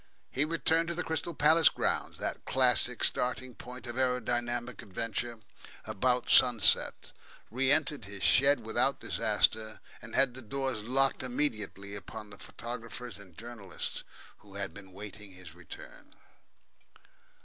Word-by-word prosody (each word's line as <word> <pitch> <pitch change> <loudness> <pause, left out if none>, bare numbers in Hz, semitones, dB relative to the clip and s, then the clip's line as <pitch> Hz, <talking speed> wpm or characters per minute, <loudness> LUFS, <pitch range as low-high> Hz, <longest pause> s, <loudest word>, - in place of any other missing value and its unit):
He 140 +3 +1
returned 165 +1 +2
to 170 - -2
the 175 - -1
Crystal 160 +1 -3
Palace 155 +2 +6
grounds, - - -1
that - - -4
classic - - +3
starting 125 0 +1
point 125 +1 -9
of 120 +1 -4
aeronautical 120 -1 0
adventure, 115 +3 -3 0.4
about 125 +3 +1
sunset, 120 -4 +4 0.4
re 130 +3 +2
entered 150 -5 +1
his 100 0 -8
shed 140 0 +5
without 110 - +1
disaster, 110 0 +1 0.2
and 115 - -8
had 135 -2 +4
the 130 - -9
doors 130 0 -2
locked 135 +5 +2
immediately 110 -7 -2
upon 105 +1 -8
the 105 - -12
photographers 115 -1 -7
and 95 -5 -14
journalists 115 -5 -5 0.4
who 100 -2 -12
been 95 -2 -13
waiting 100 0 -10
his 90 -4 -12
return. 90 -2 -12
120 Hz, 130 wpm, -31 LUFS, 105-130 Hz, 0.4 s, Palace